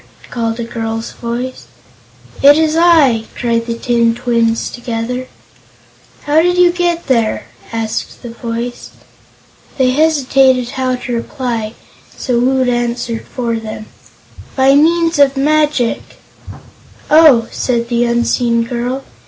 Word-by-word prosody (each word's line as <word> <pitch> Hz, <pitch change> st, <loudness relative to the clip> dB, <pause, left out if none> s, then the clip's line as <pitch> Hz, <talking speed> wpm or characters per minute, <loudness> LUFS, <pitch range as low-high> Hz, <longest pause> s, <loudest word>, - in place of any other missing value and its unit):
called 230 Hz, -1 st, -2 dB
a -, -, -2 dB
girl's 225 Hz, -1 st, -4 dB
voice. 245 Hz, +2 st, -5 dB, 0.7 s
"It's 305 Hz, +3 st, +5 dB
I!" 315 Hz, -10 st, +4 dB
cried 230 Hz, -1 st, -1 dB
the 230 Hz, -, -2 dB
tin 235 Hz, -1 st, +1 dB
twins, 235 Hz, -2 st, 0 dB
together. 240 Hz, +1 st, -4 dB, 1.0 s
"How 300 Hz, +2 st, +3 dB
did 355 Hz, +1 st, +1 dB
you 355 Hz, -1 st, +5 dB
get 345 Hz, -1 st, -1 dB
there?" 230 Hz, -5 st, 0 dB, 0.3 s
asked 225 Hz, +1 st, -4 dB
the 240 Hz, -, -7 dB
voice. 235 Hz, +1 st, -5 dB, 0.9 s
They 255 Hz, -2 st, +3 dB
hesitated 270 Hz, -4 st, +2 dB
how 255 Hz, -1 st, -1 dB
to 250 Hz, 0 st, -6 dB
reply, 235 Hz, -2 st, -4 dB, 0.4 s
so 245 Hz, -2 st, -1 dB
Woot 260 Hz, +1 st, +1 dB
answered 240 Hz, -1 st, -2 dB
for 235 Hz, -3 st, -3 dB
them: 215 Hz, -1 st, -7 dB, 0.7 s
"By 270 Hz, 0 st, +4 dB
means 330 Hz, +2 st, +3 dB
of 275 Hz, -1 st, +4 dB
magic." 295 Hz, -4 st, +1 dB, 1.1 s
"Oh," 300 Hz, -7 st, +6 dB
said 235 Hz, -2 st, -1 dB
the 240 Hz, 0 st, +1 dB
unseen 235 Hz, 0 st, +1 dB
girl. 245 Hz, +3 st, -3 dB
245 Hz, 120 wpm, -15 LUFS, 235-275 Hz, 1.1 s, Oh